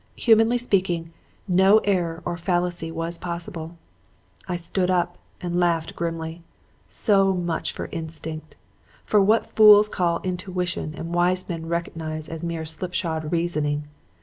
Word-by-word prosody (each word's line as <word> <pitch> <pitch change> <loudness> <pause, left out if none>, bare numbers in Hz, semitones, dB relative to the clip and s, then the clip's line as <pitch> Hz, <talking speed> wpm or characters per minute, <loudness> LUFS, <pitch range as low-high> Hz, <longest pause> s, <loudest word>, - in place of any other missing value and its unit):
Humanly 225 +1 +4
speaking, 180 -8 0 0.3
no 190 +3 +5
error 175 -4 0
or 175 - -2
fallacy 175 -1 -1
was 165 +1 -4
possible. 170 -1 -5 0.7
"I 180 - -2
stood 180 +2 +1
up 175 -1 0 0.2
and 175 0 -1
laughed 165 -2 0
grimly. 165 0 -4 0.5
So 195 -3 +2
much 175 -2 -2
for - - -6
instinct! 160 -2 -6 0.5
For 210 - +4
what 215 +4 +2
fools 210 -1 +8
call 170 -4 0
intuition 180 -3 -3
and 165 +1 -5
wise 180 +1 +2
men 165 -2 -5
recognize 160 -2 -3
for 165 0 -6
mere 165 -1 -3
slipshod 160 -1 -3
reasoning! 150 -4 -1
175 Hz, 130 wpm, -24 LUFS, 165-185 Hz, 0.7 s, fools